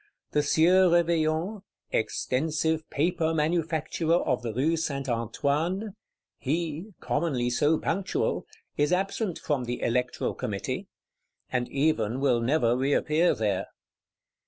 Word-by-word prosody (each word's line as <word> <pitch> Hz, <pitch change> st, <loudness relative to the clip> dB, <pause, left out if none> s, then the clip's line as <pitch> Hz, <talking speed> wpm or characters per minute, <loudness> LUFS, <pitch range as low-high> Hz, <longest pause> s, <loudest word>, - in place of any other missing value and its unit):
The 150 Hz, -, +3 dB
Sieur 175 Hz, +5 st, +5 dB
Réveillon, 170 Hz, +3 st, +1 dB, 0.3 s
"extensive 155 Hz, +7 st, 0 dB
Paper 160 Hz, +1 st, 0 dB
Manufacturer 160 Hz, +1 st, +1 dB
of 125 Hz, -, 0 dB
the 120 Hz, -2 st, -3 dB
Rue 140 Hz, +9 st, +1 dB
St. 140 Hz, -4 st, -2 dB
Antoine;" 145 Hz, -, -1 dB, 0.5 s
he, 165 Hz, +6 st, -3 dB
commonly 135 Hz, -6 st, 0 dB
so 150 Hz, +6 st, +3 dB
punctual, 185 Hz, +5 st, -1 dB, 0.3 s
is 145 Hz, +2 st, +2 dB
absent 195 Hz, 0 st, 0 dB
from 140 Hz, -5 st, -1 dB
the 120 Hz, +1 st, -3 dB
Electoral 125 Hz, +1 st, 0 dB
Committee;—and 125 Hz, -1 st, -5 dB
even 135 Hz, -5 st, +1 dB
will 130 Hz, -4 st, +2 dB
never 120 Hz, -1 st, +2 dB
reappear 150 Hz, +5 st, +2 dB
there. 105 Hz, -4 st, -1 dB
155 Hz, 110 wpm, -27 LUFS, 130-165 Hz, 0.5 s, Sieur